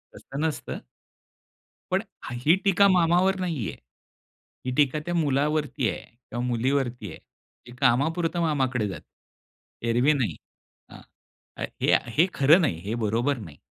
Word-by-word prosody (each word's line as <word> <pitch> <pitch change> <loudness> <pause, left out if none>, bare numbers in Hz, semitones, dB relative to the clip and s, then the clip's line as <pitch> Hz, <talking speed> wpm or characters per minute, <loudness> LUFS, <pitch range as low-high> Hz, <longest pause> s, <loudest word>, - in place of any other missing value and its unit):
तसं 135 - -8
नसतं 160 -1 -3 1.1
पण - - +2 0.2
ह - - -6
ही 160 +5 +6
टीका 200 0 +5
मामावर 185 +1 +3
नाहीये. 165 - -2 0.9
ही 130 - -1
टीका 145 +1 +3
त्या 175 - -2
मुलावरती 150 -4 +1
आहे 90 - -5
किंवा 120 0 -8
मुलीवरती 125 -2 -1
आहे, - - -9 0.5
की 120 - -12
कामापुरतं 160 +7 +1
मामाकडे 130 -8 0
जाते. 90 -6 -7 0.9
एरवी 125 +6 +4
नाही. 130 -6 -1 0.6
हां. - - -12 0.6
आ - - -4 0.2
हे - - +3
आ - - +6 0.2
हे 170 +4 +6
खरं 150 +7 +6
नाही. 90 - 0
हे 110 +3 -2
बरोबर 120 +6 +1
नाही. 85 - -10
140 Hz, 140 wpm, -26 LUFS, 120-160 Hz, 1.1 s, ही